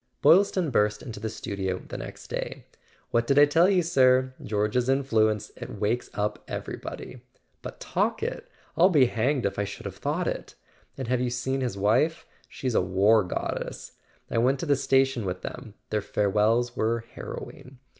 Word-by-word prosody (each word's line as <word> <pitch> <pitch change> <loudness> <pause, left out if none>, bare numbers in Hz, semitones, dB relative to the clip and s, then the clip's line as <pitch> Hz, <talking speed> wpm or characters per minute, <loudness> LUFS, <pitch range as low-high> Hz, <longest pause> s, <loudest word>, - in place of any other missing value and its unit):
Boylston 175 0 +5
burst 105 -2 +1
into 110 -3 -7
the 110 +1 -3
studio 95 -4 -3
the - - -10
next - - -8
day. - - -5 0.5
"What 115 0 +1
did 140 - +2
I 145 - +9
tell 165 +5 +4
you, 185 -3 +3
sir? 130 -5 +3
George's 105 +4 0
influence—it 110 -6 0
wakes 110 +4 0
up 105 0 -2
everybody. - - -6 0.4
But - - -8
Talkett—I'll 180 +3 0
be 145 -8 +5
hanged 125 +2 0
if 100 - -1
I - - +2
should 100 - -7
have - - -6
thought - - -1
it! - - -4 0.4
And 130 -3 -4
have 125 0 +1
you 125 - 0
seen 130 +2 -2
his 120 -6 -2
wife? 120 +12 +2 0.2
She's 130 -2 -3
a - - +3
war 100 +4 +4
goddess! 90 - -4 0.4
I - - +1
went 130 +3 +2
to - - -2
the 145 -2 +3
station 135 -2 +2
with 90 -1 -4
them: 115 -5 -7 0.2
their 105 - +1
farewells 105 +5 +1
were 115 +1 0
harrowing. 130 0 -8
120 Hz, 165 wpm, -26 LUFS, 105-135 Hz, 0.5 s, I